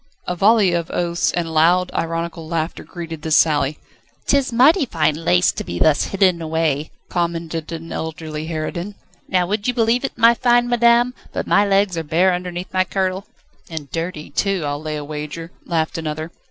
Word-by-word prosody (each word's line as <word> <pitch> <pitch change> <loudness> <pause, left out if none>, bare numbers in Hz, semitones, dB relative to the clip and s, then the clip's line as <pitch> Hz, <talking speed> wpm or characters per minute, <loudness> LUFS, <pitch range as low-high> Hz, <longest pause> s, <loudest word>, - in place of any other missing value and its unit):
A 180 - -2
volley 200 -1 +4
of 170 -1 -1
oaths 170 -1 0
and 165 -2 -2
loud, 175 +3 +3
ironical 165 0 -3
laughter 165 0 -3
greeted 165 -3 -7
this 155 0 +1
sally. 150 -2 +3 0.5
"'Tis 275 -2 +2
mighty 275 +6 +5
fine 160 -6 +1
lace 120 - +2
to - - -5
be 85 - -5
thus 150 - +3
hidden 185 -3 +2
away," 160 -2 -1 0.2
commented 170 -2 -3
an 165 0 -6
elderly 160 -1 -5
harridan. 170 +5 -4 0.3
"Now, 180 -2 +2
would 205 +4 -2
you 250 - 0
believe 235 +1 +2
it, 270 - -4
my 230 0 +6
fine 240 0 +3
madam, 240 +1 +4 0.2
but - - -2
my 205 +1 +3
legs 195 -3 +2
are - - -3
bare 175 +5 +2
underneath 180 0 -5
my 185 0 +3
kirtle?" 190 0 -2 0.4
"And 155 -4 -7
dirty, 165 -3 -4
too, 195 +2 0
I'll 145 0 -3
lay 155 -1 -4
a 150 -1 -5
wager," 150 +3 -6 0.2
laughed 165 -1 -1
another. 155 +1 -4
170 Hz, 180 wpm, -20 LUFS, 160-195 Hz, 0.5 s, my